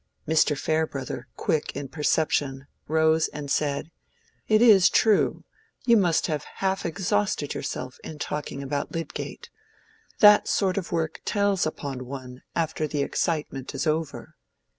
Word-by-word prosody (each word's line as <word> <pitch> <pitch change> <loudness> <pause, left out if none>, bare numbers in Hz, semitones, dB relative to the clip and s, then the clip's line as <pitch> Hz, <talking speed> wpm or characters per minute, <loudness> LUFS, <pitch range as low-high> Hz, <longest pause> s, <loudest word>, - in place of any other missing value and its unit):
Mr. 155 -1 +3
Farebrother, 145 -5 -2
quick 155 - -1
in 140 0 -4
perception, 145 -2 0 0.2
rose 160 +1 +3
and 145 -2 -7
said, 145 +2 -1 0.6
"It 215 0 +4
is 215 -6 +7
true; 215 -2 +3 0.4
you 235 - +6
must 175 -7 +3
have 155 -3 -2
half 190 -2 -1
exhausted 190 -3 -1
yourself 130 0 -5
in 155 - -7
talking 145 -1 -4
about 140 +1 -3
Lydgate. 165 0 -6 0.7
That 210 -1 +7
sort 195 -1 +1
of 185 - -8
work 160 -2 -2
tells 200 -4 +1
upon 135 -5 -5
one 130 -1 -8
after 160 -1 -1
the 145 -1 -1
excitement 145 -5 -2
is 135 - -2
over." 155 -1 -2
155 Hz, 135 wpm, -26 LUFS, 140-180 Hz, 0.7 s, is